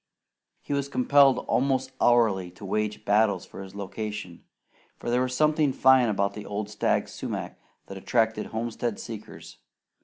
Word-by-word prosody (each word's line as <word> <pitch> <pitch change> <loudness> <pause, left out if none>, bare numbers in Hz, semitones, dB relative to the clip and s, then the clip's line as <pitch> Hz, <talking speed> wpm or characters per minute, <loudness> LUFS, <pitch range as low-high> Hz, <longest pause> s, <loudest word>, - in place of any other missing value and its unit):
He - - -4
was 140 0 -1
compelled 135 0 +4
almost 130 0 +1
hourly 110 -7 +3
to 100 - -11
wage 105 +2 -2
battles 100 -2 +2
for - - -10
his 95 0 -10
location, 105 -2 -6 0.5
for 120 - -4
there 125 +1 +2
was 130 0 -1
something 155 0 +3
fine 130 -2 +5
about 100 -1 0
the 105 - -7
old 105 0 -4
stag 105 - 0
sumac - - -6 0.3
that 95 - -9
attracted 110 +1 0
homestead 115 0 -3
seekers. 110 -2 -9
110 Hz, 150 wpm, -26 LUFS, 100-130 Hz, 0.5 s, fine